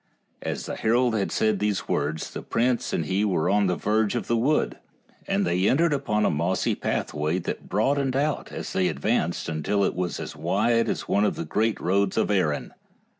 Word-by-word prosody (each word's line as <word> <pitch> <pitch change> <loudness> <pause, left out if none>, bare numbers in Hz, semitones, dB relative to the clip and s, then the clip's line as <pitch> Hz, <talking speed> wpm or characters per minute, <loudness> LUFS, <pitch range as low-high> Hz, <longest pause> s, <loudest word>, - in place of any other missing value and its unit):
As - - -4
the - - -4
herald 120 +2 +2
had 100 -3 -1
said 110 0 +1
these 105 -2 -1
words 75 +2 -1
the - - -6
prince 120 +1 0
and 80 - -1
he 95 +5 0
were 90 -4 +1
on 100 -1 +3
the 90 - +1
verge 110 +2 +1
of 120 - -2
the 115 - +1
wood, 135 +7 +1 0.5
and - - +1
they 90 +3 +2
entered 160 +3 +3
upon 105 -7 0
a - - +3
mossy 85 +5 0
pathway 75 +3 -1
that 90 - -5
broadened 135 +6 +1
out 145 +2 -1
as - - -6
they 95 -1 +2
advanced 75 +4 -1
until 80 +6 0
it - - +1
was 90 -1 -3
as - - -6
wide 105 +9 +1
as - - -3
one 100 - +2
of 105 - +1
the 85 - -4
great 110 +6 0
roads 95 +2 +1
of - - +2
Erin. 85 -7 0
100 Hz, 200 wpm, -25 LUFS, 85-115 Hz, 0.5 s, on